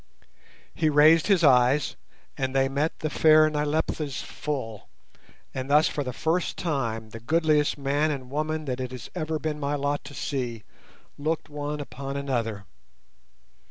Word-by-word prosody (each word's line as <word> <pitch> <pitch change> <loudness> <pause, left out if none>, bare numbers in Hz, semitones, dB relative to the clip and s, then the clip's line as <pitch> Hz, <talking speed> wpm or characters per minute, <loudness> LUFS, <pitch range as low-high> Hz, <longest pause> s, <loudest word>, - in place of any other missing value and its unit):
He 160 -1 +1
raised 155 +2 +6
his 195 -5 +3
eyes, 130 -1 +4 0.4
and 130 0 -2
they 135 0 +3
met 140 +4 -2
the 155 - -1
fair 155 0 +6
Nyleptha's 150 -1 -1
full, 130 -8 -5 0.6
and 130 0 -4
thus 150 +2 +5
for 145 - -2
the 125 - -4
first 160 +7 -1
time 115 -9 -2
the 115 - -8
goodliest 155 +4 +2
man 145 +2 +1
and 130 -4 -5
woman 155 +1 -2
that 130 -2 -3
it 130 -1 -3
has 125 -4 -8
ever 160 -3 -2
been 150 0 -3
my 145 0 -1
lot 145 0 -1
to 145 +1 -9
see 120 -6 -3 0.6
looked 155 +2 -2
one 150 0 -4
upon 140 -1 -6
another. 115 -7 -2
145 Hz, 155 wpm, -26 LUFS, 130-155 Hz, 0.6 s, raised